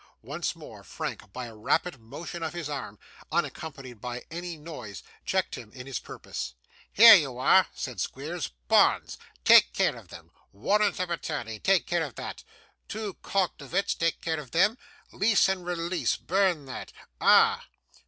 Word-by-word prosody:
Once - - -3
more, - - -12
Frank, 105 - -6
by 125 +4 -6
a 115 -2 -10
rapid 135 +7 0
motion 145 +9 -8
of 160 0 -3
his 170 -3 -4
arm, 140 -8 -5 0.3
unaccompanied 140 -8 -4
by 125 0 -6
any 175 0 -5
noise, 150 -10 -9 0.2
checked 190 -1 0
him 110 -3 -8
in 125 -1 -9
his 135 -3 -4
purpose. 65 - -7 0.4
'Here 225 +2 +10
you 145 - +4
are,' 185 +9 +5
said 125 -3 -4
Squeers, 155 +5 -4 0.2
'bonds - - +3 0.3
take - - +7
care - - +2
of - - -13
them. - - -13 0.2
Warrant 200 - +1
of 180 -1 -2
attorney 130 -10 -4
take 195 -2 +3
care 175 -1 0
of 140 -7 -7
that. - - -7 0.4
Two 215 -2 -4
cognovits 185 -3 -1
take 165 -1 -1
care 160 -1 -1
of 140 -4 -9
them. 190 - +3 0.4
Lease 205 0 +3
and 190 -1 -1
release 175 0 -1
burn 185 -5 +1
that. 130 - -7 0.3
Ah! - - +5
160 Hz, 160 wpm, -27 LUFS, 130-180 Hz, 0.4 s, Here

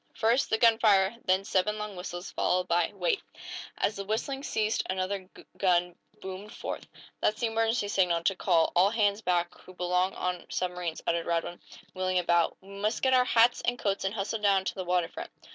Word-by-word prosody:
"First, 235 +5 +2
the 220 - +2
gunfire, 220 -3 +4
then 185 +1 +2
seven 200 +2 +1
long 210 -1 -5
whistles, 180 0 -6
followed 180 0 0
by 170 -1 +2
wait!" 465 -5 0 0.6
As 210 - 0
the 200 - -3
whistling 225 +7 -2
ceased 220 -5 0
another 185 0 -2 0.3
gun 180 -2 +2 0.3
boomed 190 +2 -7
forth. - - -6 0.3
"That's 215 - +1
the 240 - +1
emergency 225 -1 0
signal, 180 -4 +1
to 195 - +2
call 170 -3 +2
all 185 +3 +5
hands 210 -1 +1
back 175 -3 0
who 185 - -15
belong 180 +1 0
on 180 -1 -3
submarines," 180 -2 -3
uttered 170 0 0
Radwin, 170 +1 -2 0.3
wheeling 185 0 -1
about. 170 -1 +2
"We 190 - -17
must 205 +3 -2
get 260 -1 +4
our 250 -1 +5
hats 235 0 +4
and 245 +1 0
coats, 200 -3 -1
and 195 +2 -2
hustle 215 +2 -2
down 200 -2 +2
to - - -1
the 185 - -5
water 180 -1 +1
front." - - -8
195 Hz, 190 wpm, -29 LUFS, 180-215 Hz, 0.6 s, all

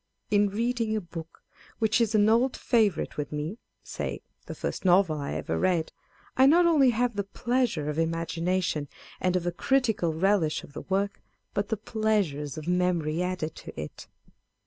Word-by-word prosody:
In 205 -1 +4
reading 230 +1 -1
a - - +1
book 165 -2 -10 0.3
which 220 +1 +2
is 225 -1 +1
an 210 0 +5
old 235 +4 +3
favourite 215 -6 +1
with 150 - -3
me 155 +9 -4 0.2
(say - - -5 0.2
the - - -6
first - - -4
novel 180 -4 +4
I 140 - -3
ever - - -2
read) 175 -4 +1 0.4
I 260 +1 +6
not 340 +5 +6
only 300 -6 +5
have 240 0 +1
the 200 - -1
pleasure 235 - -1
of 150 0 -2
imagina 165 +2 0
tion 150 -4 -2 0.3
and 185 0 +1
of 180 -1 0
a 175 - +1
critical 225 -8 +1
relish 170 -1 +1
of 140 - -13
the 150 - -6
work, 195 +1 -1 0.3
but 200 0 -1
the 220 - 0
pleasures 200 - -1
of 155 +1 -7
memory 180 -3 +1
added 180 -3 -2
to - - -9
it. 75 -1 -7
190 Hz, 175 wpm, -27 LUFS, 165-220 Hz, 0.4 s, I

